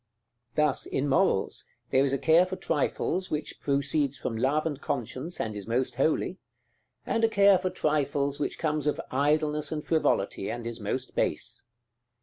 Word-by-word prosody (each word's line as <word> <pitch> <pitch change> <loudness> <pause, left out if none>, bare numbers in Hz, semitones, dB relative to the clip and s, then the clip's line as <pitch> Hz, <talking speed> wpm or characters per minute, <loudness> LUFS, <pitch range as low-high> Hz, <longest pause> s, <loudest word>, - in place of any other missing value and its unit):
Thus, 150 -3 +1
in 140 - -1
morals, 140 - +1 0.2
there 130 - +4
is 140 - +1
a 140 - +1
care 160 +7 +4
for 185 - -4
trifles 185 +1 -1
which 150 0 -4
proceeds 140 0 +1
from 120 - -3
love 135 +7 +1
and 145 -3 -3
conscience, 130 +6 -4
and 110 -2 -2
is 100 0 -7
most 120 +1 -1
holy; 160 +6 +1 0.7
and 230 -1 0
a 225 - +5
care 200 -3 +5
for 185 - -1
trifles 145 -4 0
which - - -2
comes 150 -2 -1
of 150 - 0
idleness 150 +2 +1
and 150 -1 -3
frivolity, 100 -11 +1
and 120 -1 -5
is 115 0 -4
most 125 +5 -3
base. - - -1
145 Hz, 165 wpm, -28 LUFS, 130-160 Hz, 0.7 s, a